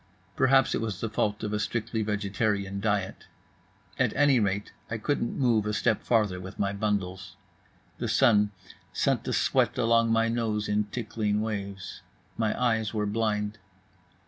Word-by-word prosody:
Perhaps 135 0 +4
it - - -1
was 110 -3 -3
the 115 - -3
fault 105 -1 -1
of 105 0 -2
a 105 - 0
strictly 115 +1 -2
vegetarian 100 -1 -1
diet. 100 -2 -2 0.7
At - - +2
any 140 -2 +4
rate, 100 -1 -1 0.2
I 115 - -2
couldn't 120 +1 -1
move 115 -6 +2
a 105 - -1
step 110 +1 +1
farther 105 -6 +1
with 95 0 -9
my 100 -1 0
bundles. 100 -2 -2 0.6
The 120 - -2
sun 110 -3 +4 0.4
sent - - +1
the - - -2
sweat - - +2
along 115 -1 +3
my 115 0 +3
nose 115 -2 -1
in 105 0 +1
tickling 105 -1 -2
waves. 100 -3 -5 0.3
My 110 -2 -1
eyes 115 -3 +1
were 105 -1 0
blind. 105 0 -1
105 Hz, 155 wpm, -28 LUFS, 105-115 Hz, 0.7 s, Perhaps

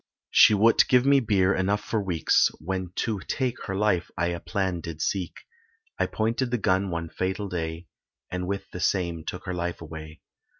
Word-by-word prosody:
She 105 - +7
would't 110 +3 +5
give 125 0 +4
me 140 0 +6
beer 100 -6 +2
enough 100 +2 0
for 110 - -1
weeks, 90 -5 +3
When 95 +1 -4
to 110 -3 -1
take 130 -3 -2
her 95 - -3
life 95 -3 +1
I 85 0 +1
a 85 0 -3
plan 90 +1 -2
did 80 -2 -7
seek, 90 +1 -2 0.6
I - - +2
pointed 115 +3 -1
the 125 - 0
gun 95 -2 +1
one 85 -1 -3
fatal 95 +4 -3
day, 80 -2 -4 0.5
And 90 0 -3
with 100 +1 -3
the 90 - -6
same 85 -4 0
took 90 +3 -6
her 90 - -3
life 85 0 -3
away. 80 -1 -9
95 Hz, 185 wpm, -26 LUFS, 85-105 Hz, 0.6 s, She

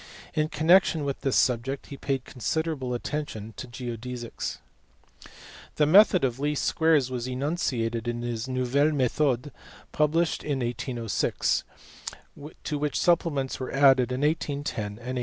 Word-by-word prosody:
In 155 0 0
connection 160 -1 +4
with 140 -1 -3
this 135 - 0
subject 130 +2 +1
he - - -5
paid 135 -2 -2
considerable 135 +1 -2
attention 120 -5 -5
to 130 - -6
geodesies. 120 0 -5 1.2
The 150 - +3
method 185 +2 +6
of 130 -1 0
least 150 0 -1
squares 155 -5 +2
was 125 -1 -3
enunciated 125 -5 -2
in 120 0 -2
his 120 0 -3
Nouvelles 130 +4 +1
methodes 135 +1 +1 0.4
published 160 +2 +1
in 140 -3 -2
1806, 120 -1 -1 1.0
to 150 -2 -2
which 150 0 -1
supplements 165 -6 +1
were 130 - -4
added 135 -2 +5
in 125 +2 -2
1810 150 -1 0 0.3
and - - -4
1820. 125 +3 -5
135 Hz, 135 wpm, -27 LUFS, 125-150 Hz, 1.2 s, method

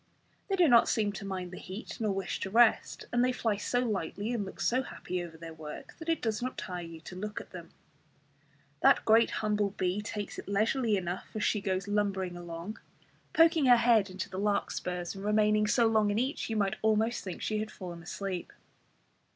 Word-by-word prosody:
They 390 - +1
do 360 -3 +5
not 235 -4 +6
seem 210 -2 +1
to 200 - -7
mind 185 -2 -4
the 180 - -8
heat, 190 +4 -7
nor 220 -2 0
to - - +1
wish 195 - -3
to - - -3
rest; 230 +2 +3
and 240 0 +3
they 255 - +3
fly 225 -4 0
so 245 +4 0
lightly 210 0 -2
and 225 -4 -1
look 190 - -9
so 255 +2 +2
happy 180 -8 -5
over 165 -2 -9
their 165 0 -8
work 155 -1 -9
that 325 0 -6
it 330 - 0
does 220 -1 -1
not 255 +1 -3
tire 180 -3 -4
you 165 -1 -9
to 180 - -9
look 210 +3 -4
at - - -12
them. - - -9 1.1
That - - +5
great 225 +1 +5
humble 210 -1 0
bee 190 +1 -1
takes 210 -1 -5
it - - -9
leisurely 215 +2 +2
enough 180 0 -4
as 215 - -1
she 210 - +1
goes 190 0 -1
lumbering 195 -3 0
along, 175 +4 -7 0.5
poking 325 -3 +5
her 245 -1 +8
head 230 -4 +4
into 185 0 -5
the 190 - -6
larkspurs, 180 -3 -1
and 195 0 -8
remaining 210 0 +3
so 235 +2 +4
long 220 -2 +3
in 205 - 0
each 260 +3 -1
you 225 - -1
might 200 -2 +1
almost 220 +2 +2
think 185 -3 -6
she 215 -1 0
had 215 0 -3
fallen 175 -5 -8
asleep. 185 +1 -5
210 Hz, 210 wpm, -30 LUFS, 185-225 Hz, 1.1 s, her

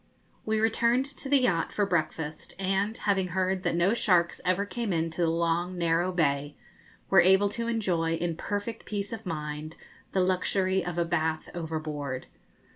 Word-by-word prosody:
We 220 0 +1
returned 235 +3 +2
to 275 -1 -4
the 280 -1 +5
yacht 180 -10 +1
for 205 - +1
breakfast, 155 -4 -2
and, 195 +3 0
having 195 -3 +1
heard 185 +1 0
that 170 - 0
no 175 +5 +3
sharks 180 -7 +2
ever 185 +3 +1
came 230 0 -3
into 165 0 -1
the 165 - +3
long, 170 +2 0
narrow 170 +1 +1
bay, 145 -4 0 0.6
were - - +8
able 190 +2 +5
to 230 +3 -2
enjoy, 180 -8 0
in 170 0 -2
perfect 205 +6 -4
peace 205 0 -3
of 225 - -7
mind, 150 -1 -5 0.3
the 190 - +2
luxury 185 0 +1
of 175 -1 -4
a 170 - +2
bath 160 -2 -1
overboard. 155 -5 -4
180 Hz, 165 wpm, -28 LUFS, 165-200 Hz, 0.6 s, were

